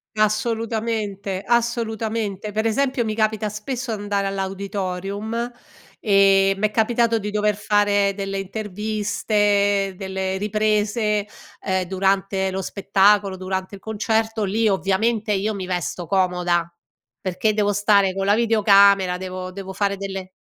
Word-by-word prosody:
Assolutamente, 215 -2 -1
assolutamente. 225 -3 -1
Per 220 +2 -1
esempio, 255 +2 +1
mi 215 -1 -2
capita 215 -1 0
spesso 230 +3 -4
d'andare 200 -1 -2
all'auditorium, 195 +3 -3 0.5
e 195 -2 +4
m'è 215 +2 +1
capitato 230 +1 +2
di 210 -1 -4
dover 210 0 +1
fare 205 -1 +2
delle 195 0 -4
interviste, 205 0 0
delle 190 0 -3
riprese, 210 +1 0 0.4
ehm, 190 -1 0
durante 190 +1 0
lo 190 +1 -3
spettacolo, 195 0 +2
durante 185 +1 -4
il - - -12
concerto, 220 0 -1
lì 215 +3 +1
ovviamente 210 +3 +1
io 205 +2 0
mi 195 -2 -5
vesto 180 -1 -3
comoda, 180 -2 +1 0.5
perché 195 +3 0
devo 205 -1 +1
stare 200 -1 +3
co' 195 0 -2
la 205 +1 +4
videocamera, 200 -4 +4
devo 185 0 -6
devo 190 0 -7
fare 200 +1 0
delle 195 -1 -6
205 Hz, 125 wpm, -22 LUFS, 195-215 Hz, 0.5 s, e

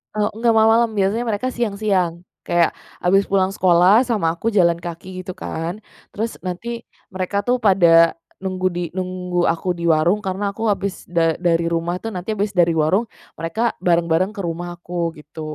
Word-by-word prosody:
Eee, 210 0 +1
nggak 230 0 +3
malam-malam, 225 +1 +4
biasanya 205 +4 +1
mereka 225 +4 -1
siang-siang. 200 -7 -1 0.2
Kayak, 175 -1 +3 0.3
habis 195 +2 +3
pulang 190 -1 +2
sekolah 185 +6 +4
sama 205 -9 +1
aku 170 +7 -5
jalan 175 -6 +3
kaki 175 +2 -7
gitu 185 0 -7
kan, 170 +6 -5 0.3
terus 225 +2 -3
nanti 230 +6 -5 0.3
mereka 190 +2 -2
tuh 250 +2 +1
pada 170 -6 +5 0.2
nunggu 185 -1 -1
di 175 0 -4
nunggu 180 -1 -2
aku 175 +2 -1
di 170 - -7
warung 165 +6 +3
karena 195 +1 -2
aku 225 +2 -1
habis 195 -1 -3
da 165 -2 +2
dari 170 -1 +1
rumah 170 +1 -1
tuh, 225 - -7
nanti 180 +4 -4
habis 205 -1 -2
dari 175 -2 +4
warung, 160 +7 +2 0.3
mereka 220 +9 -1
bareng-bareng 170 +2 +2
ke 215 - -10
rumahku 175 -1 -4
gitu. 150 +2 -11
185 Hz, 165 wpm, -20 LUFS, 170-205 Hz, 0.3 s, pada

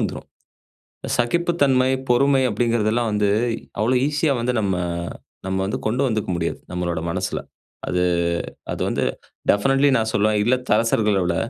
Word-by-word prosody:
வந்துரும். - - -3 0.9
சகிப்புத்தன்மை, 140 -3 +2 0.2
பொறுமை 135 +2 +4
அப்டீங்கிறதெல்லாம் 115 0 +1
வந்து 105 -1 +2 0.5
அவ்ளோ 115 +4 +2
ஈஸியா 150 0 +1
வந்து 120 +2 0
நம்ம, 100 -3 0 0.7
நம்ம 95 0 -1
வந்து 100 - -2
கொண்டு 125 +5 0
வந்துக்க 110 -4 -2
முடியாது, 85 0 -2
நம்மளோட 85 -2 -2
மனசுல. 90 +2 -2 0.5
அது 90 - 0 0.7
அது - - -4
வந்து - - -1 0.5
டெஃபினட்லி, 135 +7 +4
நான் 110 -1 0
சொல்லுவேன் 105 +1 +2
இல்லத்தரசர்கள 115 -3 +2
விட 85 -1 0
115 Hz, 125 wpm, -22 LUFS, 100-130 Hz, 0.9 s, பொறுமை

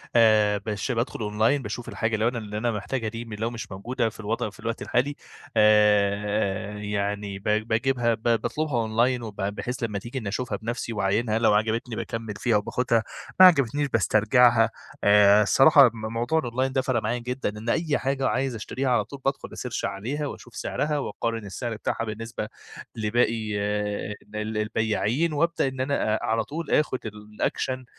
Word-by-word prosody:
آآ، 110 -3 +5
بش 105 +4 -2
بادخل 120 +1 -2
أونلاين 110 +6 +1
باشوف 120 -2 -6
الحاجة 110 0 -1
لو 110 +1 +1
أنا 120 0 -1
اللي 105 -2 -5
أنا 120 +2 0
محتاجها 110 +3 -3
دي 115 +2 -6
م 115 - -9
لو 110 +2 -2
مش 120 -3 -7
موجودة 115 +4 -2
في 110 - -16
الوضع 110 0 -2
في 95 - -18
الوقت 115 +1 -4
الحالي 135 +4 0 0.4
آآ، 105 -1 +3
يعني 105 -1 -3
ب 95 - -21
باجيبها 115 +3 +1
ب 110 0 -7
باطلبها 120 +6 0
أونلاين 120 +3 +1
وب 110 -3 -7
بحيث 105 +5 -3
لمّا 105 -3 -2
تيجي 120 +5 -5
إني 110 -5 -4
أشوفها 125 +5 -3
بنَفسي 115 0 -4
واعاينها، 105 +2 0
لو 110 -2 +4
عجبتني 110 +3 0
باكمّل 115 -1 -4
فيها 115 -3 +2
وباخدها، 115 +2 0 0.4
ما 185 - +11
عجبتنيش 145 -4 +4
باسترجعها، 115 +1 +4 0.3
آآ، 105 0 +6
الصراحة 135 +4 +7
م 110 0 -6
موضوع 120 +8 +1
الأونلاين 130 0 -1
ده 130 - +2
فرق 130 -3 0
معايا 115 +3 -1
جدًا 125 0 -3
إن 105 +2 -6
أي 155 +1 +1
حاجة 135 0 -1
عايز 130 -1 0
أشتريها 130 +5 -3
على 120 -4 +3
طول 140 +3 -10
بادخل 135 0 -1
أسيرش 125 -3 -4
عليها 120 +10 -3
واشوف 120 -3 -10
سعرها، 150 0 -1
واقارن 115 -5 -3
السعر 115 +4 -4
بتاعها 115 +2 -2
بالنسبة 110 0 -5 0.5
لباقي 110 -1 0
آآ، 105 0 -2 0.2
ال 105 0 -3
البياعين، 110 +8 0
وابدأ 170 0 +1
إن 130 -1 -4
أنا 130 -5 0
آآ، - - -2
على 110 0 0
طول 165 +6 -6
آخد 150 -4 +2
الأكشن 105 +4 -3
115 Hz, 175 wpm, -25 LUFS, 105-125 Hz, 0.5 s, ما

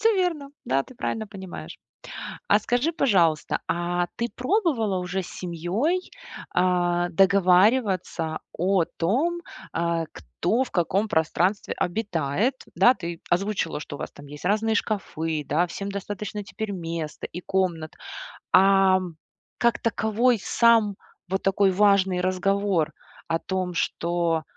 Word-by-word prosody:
Всё 450 +1 +4
верно. 330 -7 -1
Да, 135 +1 +1
ты 255 - -15
правильно 220 -2 -3
понимаешь. 190 -3 -9 0.7
А - - +6
скажи, 250 +7 0
пожалуйста, 180 - +2
а 175 +1 0
ты 235 0 -1
пробовала 250 - +1
уже 180 +1 -2
с - - -9
семьёй, 185 - -1 0.5
а, 175 -1 +2
договариваться 185 -2 +3 0.2
о 185 0 +2
том, 295 - -1 0.3
а, 170 0 0
кто 175 - -1
в - - -12
каком 195 +5 +1
пространстве 180 +3 +1
обитает? 180 - 0 0.2
Да, 250 - +6
ты 170 -4 -6
озвучила, 195 +1 0
что 145 - -7
у - - -12
вас - - -5
там 145 - -13
есть 145 +3 -11
разные 215 +2 +2
шкафы, 160 -9 -2
да, 170 +5 +2
всем 195 +3 -5
достаточно 205 +1 -5
теперь 215 +1 -5
места 165 -4 -4
и 180 - -7
комнат. 175 -5 -1 0.6
Ам, 190 -3 +4 0.4
как 235 0 +2
таковой 230 +1 +2
сам 225 -4 +4 0.3
вот 190 +2 -1
такой 195 0 +3
важный 195 -2 +3
разговор 185 -2 +1 0.4
о 165 0 +1
том, 185 -2 -2
что 170 -1 0
190 Hz, 130 wpm, -25 LUFS, 170-215 Hz, 0.7 s, А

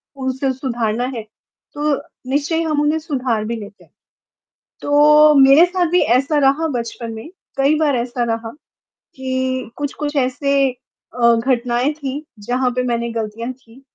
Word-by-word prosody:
उसे 265 0 -2
सुधारना 240 -3 -2
है। 225 - -4 0.5
तो 295 0 0 0.4
निश्चय 290 +3 0
ही 330 - +1
हम 305 -2 0
उन्हें 305 +2 +1
सुधार 255 -8 -2
भी 230 +1 -3
लेते 205 -2 -10
हैं। - - -26 0.9
तो, 300 +1 +5
मेरे 275 +4 +7
साथ 360 -1 0
भी 360 - +3 0.2
ऐसा 290 +3 0
रहा 285 +4 +2
बचपन 230 0 -6
में, 220 +7 -8 0.3
कई 275 +3 +3
बार 290 -4 +2
ऐसा 240 0 -2
रहा 225 -1 -3 0.7
कि 260 -2 -2
कुछ-कुछ 290 +1 -4
ऐसे 275 +1 +1 0.5
अ, 235 0 +6
घटनाएँ 245 +3 0
थीं, 285 -1 -5 0.2
जहाँ 250 +2 0
पे 250 - +1
मैंने 235 -1 -1
गलतियाँ 230 +2 -4
की 250 0 -20
260 Hz, 150 wpm, -19 LUFS, 235-290 Hz, 0.9 s, मेरे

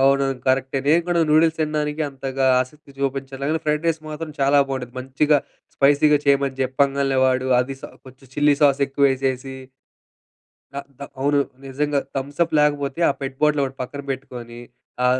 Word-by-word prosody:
అవునవును. 135 -1 +2
కరక్టే. 130 +1 +1
నేను 165 +4 +4
గూడా 175 -1 +1
నూడుల్స్ 160 +1 +4
తినడానికి 150 0 -1
అంతగా 135 -1 -2
ఆసక్తి 140 +3 -7
చూపించలేను 135 0 -3
గానీ, 160 0 0
ఫ్రైడ్ 150 +1 0
రైస్ 165 -1 0
మాత్రం 155 +1 -6
చాలా 140 +1 +4
బావుండిద్ది. 125 -2 -5
మంచిగా 140 +3 +2 0.4
స్పైసీగా 145 +1 +4
చెయమని 140 -1 +2
చెప్పంగాలనే, 135 +1 +1
వాడు 130 0 +1
అది 135 +2 -4
స - - -11 0.2
కొంచెం 130 +1 -15
చిల్లీ 145 0 +3
సాసెక్కువేసేసి. 135 -1 +1 1.2
త - - -24 0.2
త - - -9 0.2
అవును. 145 +1 +2 0.3
నిజంగా. 145 +2 -1 0.2
థమ్సప్ 145 +5 -1
లేకపోతే, 145 0 0
ఆ - - +1
పెట్ 135 -1 -5
బాటిలొకటి 140 -3 +1
పక్కన 140 +3 -6
పెట్టుకోని, 125 -3 -7 0.5
ఆ - - +5
140 Hz, 145 wpm, -22 LUFS, 135-150 Hz, 1.2 s, ఆ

